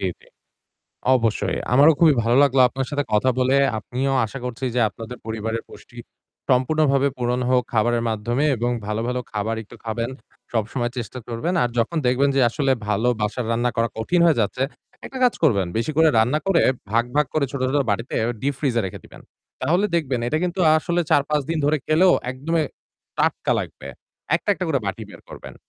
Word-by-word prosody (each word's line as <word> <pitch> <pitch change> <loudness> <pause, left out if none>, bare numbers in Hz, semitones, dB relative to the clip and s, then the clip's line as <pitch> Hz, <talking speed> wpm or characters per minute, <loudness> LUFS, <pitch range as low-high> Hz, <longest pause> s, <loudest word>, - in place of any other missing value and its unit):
জি, - - -3 0.2
জি। - - -22 0.9
অবশ্যই। 110 -6 0 0.2
আমারও 145 +5 +7
খুবই 160 -3 +5
ভালো 115 +2 +2
লাগলো 135 -2 +3
আপনার 130 +1 -4
সাথে 145 -1 -1
কথা 105 +5 +3
বলে 130 +1 +2 0.2
আপনিও 130 +5 -2
আশা 135 - -8
করছি 125 +1 -5
যে 125 - +2
আপনাদের 115 +5 -9
পরিবারের 110 +1 -3
পুষ্টি 105 +3 -15 0.5
সম্পূর্ণভাবে 140 +1 +2
পূরণ 125 0 0
হোক 125 -1 +3
খাবারের 120 +1 +2
মাধ্যমে 115 +5 -1
এবং 120 +2 -1 0.2
ভালো, 105 +1 -2
ভালো 125 0 -1
খাবার 110 +1 -2
একটু 115 +3 -15
খাবেন। 115 +2 -3 0.4
সবসময় 120 +2 -1
চেষ্টা 120 +2 -6
করবেন। 120 +10 -2
আর 120 - +1
যখন 115 +9 0
দেখবেন 130 +3 +3
যে - - +4
আসলে 135 +3 0 0.2
ভালো 105 +3 +1
বাসার 105 +3 -2
রান্না 120 +1 +1
করা 115 0 +1
কঠিন 175 +11 +1
হয়ে 160 -6 +3
যাচ্ছে, 110 +4 -1 0.4
একটা 265 - -7
কাজ 245 - +3
করবেন। 100 - +3
বেশি 115 - -1
করে 160 0 +5
রান্না 125 +7 +2
করে 195 -4 +3 0.3
ভাগ, 115 +2 +2
ভাগ 150 -1 +3
করে 155 -2 +2
ছোট, 140 - -4
ছোট - - +2
বাটিতে 115 +5 -2 0.3
ডীপ 140 +3 -1
ফ্রিজ 135 -5 0
এ - - +3
রেখে 95 - -7
দিবেন। - - -14 0.4
তাহলে 175 +5 +2
দেখবেন 135 -7 0
এটা 155 - 0
কিন্তু 180 +1 -2 0.2
আসলে 170 +2 0
৪-৫ 150 0 +2
দিন 165 - 0
ধরে 150 +2 +3
খেলেও 175 +4 +4 0.2
একদমই 155 +6 -1 0.6
টাটকা - - +1
লাগবে। 65 - -8 0.5
একটা, - - -2
একটা - - -4
করে - - +1
বাটি - - -4
বের - - -13
করবেন। - - -10
125 Hz, 185 wpm, -22 LUFS, 115-145 Hz, 0.9 s, আমারও